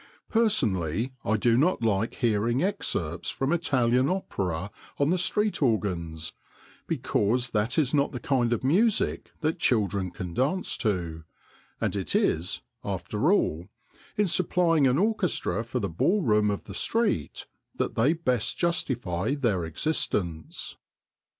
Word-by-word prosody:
Personally, 120 - +1
I 110 +1 +1
do 115 +2 +3
not 145 0 +2
like 110 0 +1
hearing 115 +4 +1
excerpts 90 - -2
from 135 +4 -1
Italian 130 -5 +2
opera 95 - -2 0.3
on 145 +2 +2
the 180 - +2
street 210 +2 +1
organs, 85 - -1 0.5
because 120 +4 0
that 110 +3 0
is 145 -4 +2
not 140 -1 +2
the 125 - -5
kind 120 -3 +1
of 120 - 0
music 195 - +2
that 160 +2 0
children 100 - +1
can 90 -1 -7
dance 145 - 0
to, 85 -7 -2 0.6
and - - -1
it - - -2
is, 85 +3 +1 0.2
after 100 - -1
all, 85 - +1 0.5
in 210 -1 +3
supplying 165 -4 +3
an 125 +1 +2
orchestra 190 - 0
for 120 +2 -3
the 100 - -1
ballroom 105 - +2
of 100 - -2
the 100 - -9
street 215 - -1 0.3
that - - -1
they 130 +8 +3
best 125 -9 -1
justify 135 - 0
their 115 - 0
existence. 85 - -2
120 Hz, 135 wpm, -27 LUFS, 100-160 Hz, 0.6 s, do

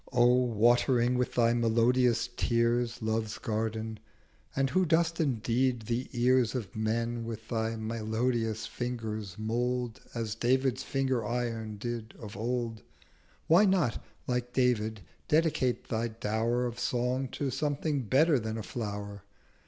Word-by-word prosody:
'O 120 -2 +4
watering 120 0 +3
with 125 0 -1
thy 115 -1 +4
melodious 120 +1 +3
Tears 120 0 +1
Love's 110 -1 -1
Garden, 110 0 -3 0.6
and 135 -1 +1
who 185 +6 +3
dost 165 0 +2
indeed 125 -3 +1
the 120 +3 -2
Ears 125 -1 +3
Of 110 -7 -4
men 115 +2 -1
with 110 -1 -7
thy 115 -1 -1
melodious 110 0 -1
Fingers 110 -6 -4
mould 120 +2 -1
As 115 -2 -2
David's 130 +2 +1
Finger 130 -3 0
Iron 115 -2 -3
did 115 0 -5
of 105 -1 -9
old: 115 -1 -2 0.6
Why 175 +6 +6
not, 185 - +1 0.2
like 125 0 -2
David, 110 -5 +1 0.3
dedicate 150 -5 +1
thy 115 0 0
Dower 115 +2 -1
Of 120 -1 -4
Song 125 +2 0
to 140 -2 -2
something 145 0 -1
better 140 +5 +3
than 110 0 -4
a 110 - -4
Flower? 100 -3 -5
120 Hz, 130 wpm, -30 LUFS, 110-125 Hz, 0.6 s, Why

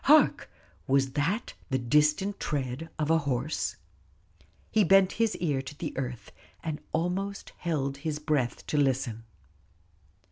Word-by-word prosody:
Hark! 300 +2 +5 0.4
was 135 0 +3
that 160 - -1 0.2
the 130 - +2
distant 150 +10 +2
tread 140 +2 -2
of 155 0 +1
a 165 - +5
horse? 140 +1 -1 1.0
He 215 - +4
bent 195 -1 +6
his 225 -1 +2
ear 145 -6 0
to 135 +2 -9
the 155 -1 -4
earth, 125 -3 -4 0.3
and 155 -2 -3
almost 185 +5 -2
held 140 -5 -1
his 150 +1 -3
breath 150 -5 -1
to 150 - -1
listen. 130 -5 +1
150 Hz, 135 wpm, -29 LUFS, 135-170 Hz, 1.0 s, bent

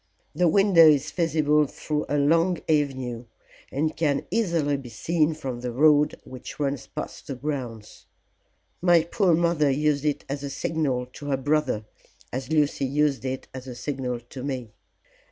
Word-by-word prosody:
The 175 +3 +2
window 185 -2 +6
is 150 -1 +3
visible 150 -3 +2
through 150 +1 -3
a 145 - +1
long 165 +5 +3
avenue, 130 -6 0 0.5
and 155 +3 -1
can 145 -4 0
easily 170 -10 +1
be 135 -3 -7
seen 155 +7 0
from 130 -5 -5
the 125 -1 -3
road 150 +3 +4
which 130 +2 -10
runs 140 -3 -2
past - - -7
the 135 - -4
grounds. 125 -6 -6 0.7
My 175 -2 +5
poor 175 0 +2
mother 170 -3 +2
used 145 +1 +1
it 150 -2 -1
as 140 +1 -4
a 140 - -4
signal 140 -3 -1
to 145 - -9
her 135 -2 +1
brother, 140 -5 0 0.5
as 130 +1 -4
Lucy 150 -3 +2
used 140 0 +1
it 130 0 -4
as 130 0 -8
a 125 - -7
signal 125 -3 -3
to 125 +2 -9
me. 130 -5 -4
145 Hz, 160 wpm, -25 LUFS, 130-155 Hz, 0.7 s, window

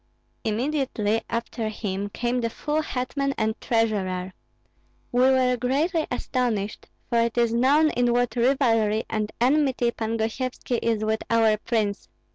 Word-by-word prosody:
"Immediately 225 -2 0
after 230 -1 -3
him 205 -2 -3
came 245 +4 -1
the 230 - 0
full 300 +6 -2
hetman 275 0 -2
and 220 0 +1
treasurer. 190 -5 0 0.8
We 245 - +2
were 255 -1 +3
greatly 300 +7 0
astonished, 245 -5 -2 0.2
for 235 - +1
it 230 0 0
is 235 -1 +2
known 285 +6 +4
in 245 0 +1
what 245 +1 +1
rivalry 230 -4 +2
and 215 -1 -1
enmity 260 -1 +2
Pan 225 0 -3
Gosyevski 240 +2 -2
is 225 -2 0
with 220 0 0
our 225 -2 +4
prince. 210 -2 -2
235 Hz, 135 wpm, -25 LUFS, 220-255 Hz, 0.8 s, known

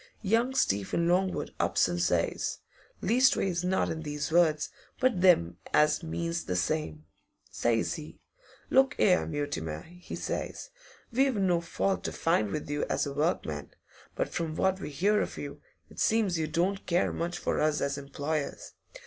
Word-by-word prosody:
Young 230 +6 +2
Stephen 100 - +1
Longwood 185 +2 +1
ups - - +3
an' 85 -1 -2
says 85 -1 0 0.5
leastways 195 -6 +3
not 185 +1 +1
in 160 - -4
these 150 0 -3
words, 160 -3 +3 0.3
but 250 -8 +2
them 85 - +4 0.2
as 150 +2 +4
means 170 +1 -3
the 90 - -2
same 90 - -1 0.5
says 115 -1 +1
he, 155 -2 -9 0.5
"Look 270 +2 +4
'ere, 180 -2 +4
Mutimer," 80 - -3
he 180 +1 -9
says, - - -4 0.4
"we've 265 +1 +2
no 185 -4 +2
fault 190 +3 -1
to - - -1
find 110 -11 +1
with 150 - -4
you 145 0 -1
as - - 0
a 140 - -4
workman, 140 - -2 0.4
but - - -1
from 160 -2 -3
what 190 +2 +1
we - - -5
hear 200 +9 +2
of - - -4
you, 145 0 -7 0.3
it - - -13
seems 210 -6 +2
you 155 - 0
don't 180 +5 -1
care 175 +1 +2
much 170 +1 -2
for - - -1
us 155 -1 +2
as 140 0 -1
employers. 140 +2 -4
165 Hz, 160 wpm, -29 LUFS, 145-190 Hz, 0.5 s, them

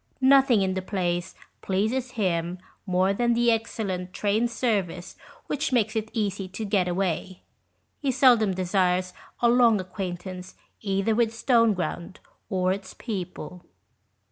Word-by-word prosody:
Nothing 265 -5 +5
in 190 0 0
the 190 - -2
place 175 -3 -2 0.3
pleases 230 +7 -1
him 175 -4 -1 0.3
more 185 +1 +2
than 235 +3 +1
the 240 0 +3
excellent 195 -5 -3
train 215 +3 +1
service 205 -7 -2 0.3
which 290 0 -2
makes 225 -3 +1
it 220 0 -2
easy 200 -4 -2
to 190 +4 -6
get 200 -3 +1
away. 185 0 -2 0.6
He 280 - -1
seldom 230 -7 +4
desires 180 0 +1 0.3
a 240 - +5
long 235 -3 +5
acquaintance 185 0 -6 0.3
either 195 +1 0
with 230 0 +2
Stoneground 225 -7 +1 0.3
or 185 -1 +1
its 190 -1 -8
people. 180 -5 -6
195 Hz, 130 wpm, -26 LUFS, 185-230 Hz, 0.6 s, Nothing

